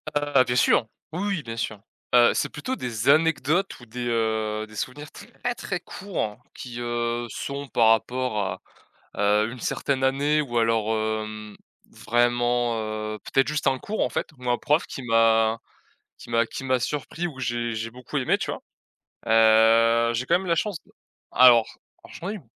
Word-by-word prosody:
Ah 145 -3 +3
bien 125 0 -2
sûr, 120 -2 +3 0.2
oui, 190 +5 -3
oui, 190 -8 -2
bien 115 0 -6
sûr. 110 -1 -3 0.4
Heu, 120 -1 +6
c'est - - -1
plutôt 255 - -4
des 120 - -4
anecdotes 165 +4 +2
ou 120 - -13
des, 120 +2 -5
heu, 110 -2 -1
des 110 - -15
souvenirs 145 +8 -6
très 245 - -5
très 180 -5 -4
courts 175 - -5
qui, 120 -2 -8
heu, 120 0 -2
sont 140 +5 -5
par 115 -1 +3
rapport 125 0 +1
à, 100 - -3 0.8
heu, 110 - -3
une 125 - -9
certaine 130 +2 -1
année 145 +3 +2
ou 125 -5 -4
alors, 115 -1 +1
hem, 110 -1 -4 0.3
vraiment, 120 0 +1
heu, 110 0 -4
peut-être 135 - +1
juste 150 0 -2
un 135 -1 +3
cours 215 - -4
en - - 0
fait, - - -3
où 125 -1 -6
un 120 - +3
prof 150 +3 +1
qui 135 - -7
m'a 115 -1 +3 0.6
qui - - -13
m'a 115 0 +2
qui 135 - -7
m'a 130 -1 +2
surpris 150 +6 -3
ou 140 -6 -8
j'ai 120 -2 -2
j'ai 110 +1 -4
beaucoup 125 +1 -8
aimé, - - +1
tu - - -3
vois? - - -6 0.7
Heu, 115 +1 +5
j'ai 120 +2 -1
quand 175 - +3
même 190 - -7
la 170 - +3
chance 185 +2 -2
d - - -23 0.4
alors, 120 -3 +7 0.4
j'en 185 - -6
ai - - -4
eu - - -6
b, 165 - -18
120 Hz, 185 wpm, -25 LUFS, 115-140 Hz, 0.8 s, alors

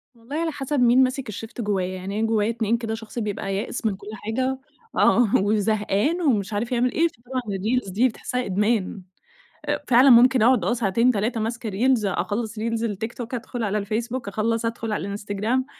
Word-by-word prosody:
والله 235 +5 -9
على 325 +1 0
حسب 290 -1 -2
مين 250 +1 +5
ماسك 255 -1 -2
الشيفت 225 +3 -6
جوّايا. 200 -4 0
يعني 195 +3 -4
أنا 225 - +1
جوّايا 220 -1 +1
اتنين 230 0 0
كده، 225 -1 -4
شخص 225 +1 -7
بيبقى 200 -2 -3
يائس 215 +4 -4
من 210 -3 +1
كل 200 - -14
حاجة 255 +5 -2 0.4
آه، 240 -4 +4
وزهقان 210 - +1
ومش 215 - +1
عارف 230 +4 -2
يعمل 245 +1 +2
إيه، 330 +5 +2
فطبعًا 255 -3 -6
الreels 210 0 -2
دي 225 +7 +3
بتحسها 250 +1 -3
إدمان. 205 0 0 0.6
أ - - 0
فعلًا 255 +2 +6
ممكن 250 0 +6
أقعد 250 +2 +4
آه، - - +1
ساعتين 230 +2 +2
3 220 +2 -1
ماسكة 225 0 -3
reels. 235 +3 +2
أخلّص 205 +5 -2
reels 215 - -4 0.2
التيك 220 +1 -3
توك 245 +1 -6
أدخُل 240 0 -4
على 210 0 0
الفيسبوك، 230 +3 -3
أخلّص 225 +3 -1
أدخُل 230 -1 -3
على 205 - -2
الإنستجرام. 205 +5 -2
225 Hz, 185 wpm, -24 LUFS, 210-250 Hz, 0.6 s, فعلًا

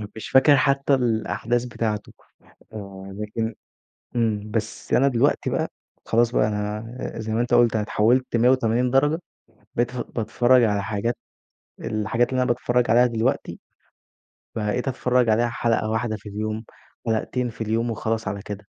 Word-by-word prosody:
مش 110 - -7
فاكر 135 +2 +6
حتى 140 +1 +2
الأحداث 120 -1 0
بتاعته، 110 -3 -3 0.6
آه، 100 -2 -8
لكن 110 +1 -3 0.6
إمم، 110 -2 0
بس 110 -1 -3
أنا 135 +2 +5
دلوقتي 120 -3 +2
بقى - - -1 0.3
خلاص 120 +1 +2
بقى 110 - +2
أنا 105 +1 -3 0.3
زي 110 0 -3
ما 115 - +1
أنت 120 - -1
قُلت 120 -2 +5
أنا 105 - +1
اتحوّلت 120 +4 +2
180 125 0 +3
درجة، 145 +5 +3 0.6
بتف 120 +1 -1
باتفرّج 120 +3 +2
على 105 -2 +1
حاجات 115 +3 -2 0.7
الحاجات 110 +3 0
اللي 130 -1 +1
أنا - - -1
باتفرّج 120 0 +1
عليها 120 +2 +6
دلوقتي، 115 -2 -1 1.0
بقيت 110 +5 -1
أتفرّج 125 -1 +1
عليها 120 +2 +3
حلقة 115 -2 0
واحدة 110 -1 -1
في 105 0 -11
اليوم، 110 +2 -4 0.4
حلقتين 120 +2 -1
في 115 - -17
اليوم، 115 +2 0
وخلاص 110 -1 -2
على 100 0 -4
كده. 105 0 -7
115 Hz, 145 wpm, -23 LUFS, 110-125 Hz, 1.0 s, فاكر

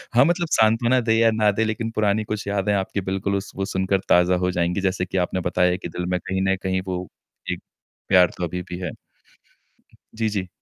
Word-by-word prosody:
हाँ, 125 +3 +7
मतलब 175 0 +1
साँत्वना 115 +3 +3
दे 110 -1 +1
या 115 -1 +5
ना 105 -1 +3
दे 110 +2 0
लेकिन 115 +1 -2
पुरानी 110 0 +1
कुछ 105 -1 -4
यादें 100 0 0
आपकी 100 0 -1
बिल्कुल 100 +1 -1
उस 100 - -6
वो 95 0 -2
सुनकर 95 0 0
ताज़ा 90 +1 +5
हो 90 - +1
जाएँगी, 90 +2 0
जैसे 95 -1 0
कि 95 - -4
आपने 95 - -3
बताया 90 +1 +2
कि - - -7
दिल 90 - -4
में - - 0
कहीं 95 0 -3
न - - -2
कहीं 95 0 0
वो 90 -1 -2 0.5
एक - - -4 0.5
प्यार 90 -1 +5
तो 90 - -4
अभी 90 +2 -4
भी 90 - -5
है। 90 - -4 1.2
जी, 110 -1 0
जी। 95 -3 -3
100 Hz, 215 wpm, -23 LUFS, 90-110 Hz, 1.2 s, हाँ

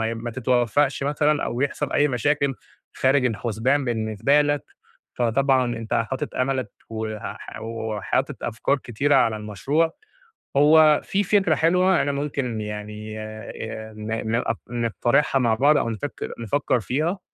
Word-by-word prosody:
ما 115 +1 -2
تتوفقش 130 +3 +1
مثلًا 150 +1 +1
أو 120 - -3
يحصل 140 +1 -1
أي 145 +1 +3
مشاكل 140 +2 +1 0.4
خارج 130 0 +2
الحسبان 120 +4 0
بالنسبة 115 +3 +1
لك، 145 -1 0 0.5
فطبعًا 125 0 +2
أنت 115 -1 -4
حاطط 120 +3 -2
أملك 130 -3 -1 0.2
وح 110 -1 -6
وحاطط 110 -2 -2
أفكار 130 +5 0
كتيرة 135 +4 0
على 115 -5 +3
المشروع 135 - 0 0.7
هو 150 +1 +6
في 200 +1 0
فكرة 190 -4 +3
حلوة، 180 +2 +3
أنا 145 - 0
ممكن 140 -5 -2
يعني 105 +1 -6
آآ 110 0 -7
ن 110 +1 -3
ن - - +2
أق 115 -1 -1
نقترحها 120 +4 +1
مع 120 -3 +2
بعض 145 +5 +4
أو 115 - 0
نفكر 115 +6 -5
نفكر 125 +3 0
فيها، 155 - -1
125 Hz, 135 wpm, -23 LUFS, 110-145 Hz, 0.7 s, هو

